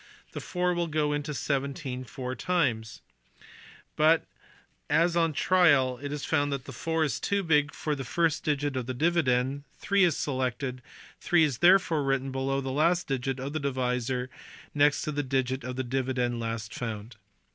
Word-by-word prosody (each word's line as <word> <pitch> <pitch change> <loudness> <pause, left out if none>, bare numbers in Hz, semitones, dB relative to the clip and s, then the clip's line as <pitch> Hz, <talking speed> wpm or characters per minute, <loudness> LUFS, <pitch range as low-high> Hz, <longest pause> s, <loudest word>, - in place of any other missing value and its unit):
Then - - -6
4 180 0 0
will 175 -1 -1
go 150 -2 0
into 145 +1 -3
17 140 -2 -3
four 130 0 -5
times; 125 - -1 0.9
but, 160 +2 +4 0.6
as 170 0 +3
on 165 -1 +3
trial 145 -8 +3
it 145 0 -5
is 145 -1 -4
found 145 -2 +1
that 140 -2 -3
4 160 +3 -2
is 145 -2 -1
too 200 +5 0
big 150 -3 +2
for 155 - -3
the 135 -2 -4
first 165 +4 0
digit 145 -2 -1
of 125 -2 -3
the 130 - -3
dividend, 140 -3 +1
3 200 -1 +2
is 170 -5 +3
selected; 130 -1 -2 0.4
3 175 -2 +3
is 140 -6 0
therefore 175 -3 +5
written 135 0 0
below 135 +1 -1
the 135 0 -4
last 170 +6 +2
digit 135 0 -2
of 135 +3 -5
the 155 - -1
divisor 125 -2 -1
and 125 - -10 0.4
next 145 0 +3
to 155 - -2
the 145 0 -1
digit 130 -1 -1
of 125 +1 -5
the 130 - -2
dividend 125 -1 -1
last 115 -2 -4
found. 110 -2 -6
140 Hz, 175 wpm, -28 LUFS, 130-155 Hz, 0.9 s, therefore